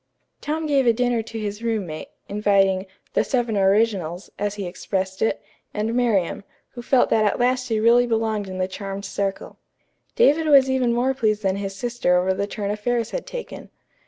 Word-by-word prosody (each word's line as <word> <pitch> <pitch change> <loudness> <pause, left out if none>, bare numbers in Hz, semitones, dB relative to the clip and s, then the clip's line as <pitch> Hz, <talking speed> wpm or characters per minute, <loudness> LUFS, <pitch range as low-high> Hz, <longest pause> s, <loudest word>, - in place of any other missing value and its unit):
Tom 315 +2 -2
gave 275 -4 +2
a 235 - +6
dinner 245 0 +1
to 225 +1 -8
his 210 0 -4
roommate, 205 -9 -3 0.2
inviting 195 -2 +2 0.3
"the - - +3
seven 240 -4 -1
originals," 195 -3 +1
as 205 0 -1
he 200 -2 -4
expressed 190 +1 -3
it, 220 - +1 0.4
and 215 +2 -1
Miriam, 225 -8 +1 0.3
who 240 - -9
felt 250 +1 +2
that 220 - +4
at 210 - +1
last 255 +1 +1
she 225 -3 0
really 235 +2 +4
belonged 220 -3 -1
in 185 - -6
the 185 0 0
charmed 195 +1 -6
circle. 195 0 -4 0.6
David 320 -8 +4
was 270 -3 +6
even 255 -2 +2
more 245 +3 +1
pleased 215 -5 0
than 190 0 +1
his 195 -1 -4
sister 235 -4 +1
over 185 +1 +1
the 200 +2 -2
turn 205 -1 -3
affairs 230 +2 -1
had - - -4
taken. - - -7
215 Hz, 185 wpm, -23 LUFS, 195-245 Hz, 0.6 s, a